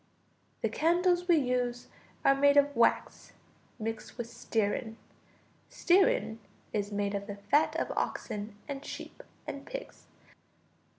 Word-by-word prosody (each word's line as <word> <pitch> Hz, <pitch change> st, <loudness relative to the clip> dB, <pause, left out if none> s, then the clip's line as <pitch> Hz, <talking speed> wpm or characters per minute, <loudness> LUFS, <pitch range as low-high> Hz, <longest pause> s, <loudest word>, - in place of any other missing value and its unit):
The -, -, +2 dB
candles 350 Hz, +2 st, +2 dB
we 345 Hz, -, +6 dB
use 250 Hz, -3 st, 0 dB, 0.4 s
are 275 Hz, -, +7 dB
made 285 Hz, +1 st, +4 dB
of 285 Hz, 0 st, +4 dB
wax 235 Hz, -, +1 dB, 0.4 s
mixed 225 Hz, 0 st, -5 dB
with 240 Hz, -2 st, -4 dB
stearine. 220 Hz, +1 st, -1 dB, 0.7 s
Stearine 380 Hz, -, +3 dB, 0.3 s
is 205 Hz, -1 st, -1 dB
made 205 Hz, 0 st, -1 dB
of 200 Hz, 0 st, -3 dB
the 205 Hz, -, -5 dB
fat 285 Hz, +10 st, +2 dB
of -, -, -1 dB
oxen 205 Hz, 0 st, -3 dB
and 280 Hz, -1 st, -5 dB
sheep -, -, -8 dB, 0.2 s
and 280 Hz, -, -6 dB
pigs. -, -, -8 dB
250 Hz, 125 wpm, -30 LUFS, 220-300 Hz, 0.7 s, are